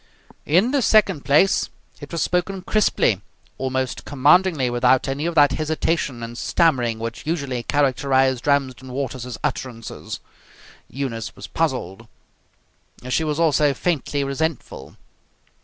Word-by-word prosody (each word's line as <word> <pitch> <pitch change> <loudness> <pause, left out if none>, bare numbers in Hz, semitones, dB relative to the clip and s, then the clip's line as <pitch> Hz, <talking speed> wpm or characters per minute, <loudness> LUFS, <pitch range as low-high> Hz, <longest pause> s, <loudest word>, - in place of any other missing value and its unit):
In 185 - +3
the 280 -1 +2
second 200 - +3
place, 170 +7 +3 0.3
it 145 - -10
was 165 -3 -1
spoken 180 +1 -1
crisply, 180 - +2 0.4
almost 130 -1 -2
commandingly, 150 +1 +3
without 125 +2 +2
any 140 +4 -2
of 170 - -3
that 145 -2 +6
hesitation 155 -5 -1
and 115 0 -7
stammering 125 -9 +1
which 115 +4 -6
usually 140 -7 -2
characterized 135 -1 +1
Ramsden 130 -3 0
Waters's 130 -3 -4
utterances. 125 -5 -5 0.7
Eunice 120 -4 -4
was - - -9
puzzled. 115 - -2 1.0
She 160 - +1
was 150 0 -2
also 150 -3 +3
faintly 145 -4 -1
resentful. 140 - -4
140 Hz, 120 wpm, -22 LUFS, 125-160 Hz, 1.0 s, that